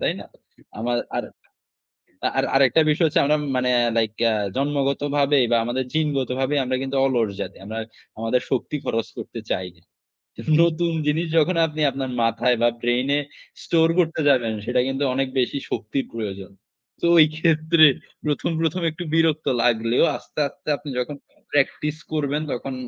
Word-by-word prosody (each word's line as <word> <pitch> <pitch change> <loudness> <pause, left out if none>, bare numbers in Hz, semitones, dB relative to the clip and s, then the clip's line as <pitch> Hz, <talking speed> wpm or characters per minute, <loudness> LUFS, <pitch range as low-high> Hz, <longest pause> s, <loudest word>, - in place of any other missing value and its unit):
তাই - - +1
না? - - -9 0.5
আমার 120 +2 -1 0.2
আর, - - -1 1.1
আর - - +2
আরেকটা 135 +2 +5
বিষয় 160 +3 +3
হচ্ছে 155 - +2
আমরা 150 +2 +3 0.2
মানে 125 0 +1 0.3
লাইক 110 -2 +1 0.4
জন্মগতভাবে 140 +1 +1
বা 120 - +4
আমাদের 125 +2 -2
জিনগতভাবেই 140 -2 0
আমরা 130 0 -1
কিন্তু 135 0 -3
অলস 120 -6 +1
জাতি। - - -5
আমরা 110 +2 -5 0.4
আমাদের 115 +3 +1
শক্তি 135 +3 -1
খরচ 115 0 -1
করতে - - -7
চাই 90 0 -2
না। 85 - -26 0.8
নতুন 170 0 +1 0.2
জিনিস 160 +3 +1
যখন 165 +3 +3
আপনি 155 -1 -4
আপনার 135 -1 -4
মাথায় 115 +2 +2
বা 120 - +5
ব্রেইন 120 +2 +1
এ - - +2 0.4
স্টোর 165 -1 +3
করতে 165 -2 +1
যাবেন 120 -5 +2
সেটা 125 0 +1
কিন্তু 135 +1 -2
অনেক 135 +1 0
বেশি 125 +2 0
শক্তির 120 +6 -2
প্রয়োজন। 100 -4 -6 0.5
তো - - 0
ওই 160 - +9
ক্ষেত্রে 160 0 +4 0.4
প্রথম, 150 +3 -1
প্রথম 165 +2 0
একটু 170 +3 -7
বিরক্ত 160 -1 +2 0.2
লাগলেও 115 +3 +3
আস্তে, - - -9
আস্তে - - -10
আপনি 145 - -9
যখন 135 +4 -3 0.4
প্র্যাকটিস 145 +1 0 0.2
করবেন 150 0 -1
তখন 130 +2 -4
135 Hz, 155 wpm, -23 LUFS, 120-155 Hz, 1.1 s, ওই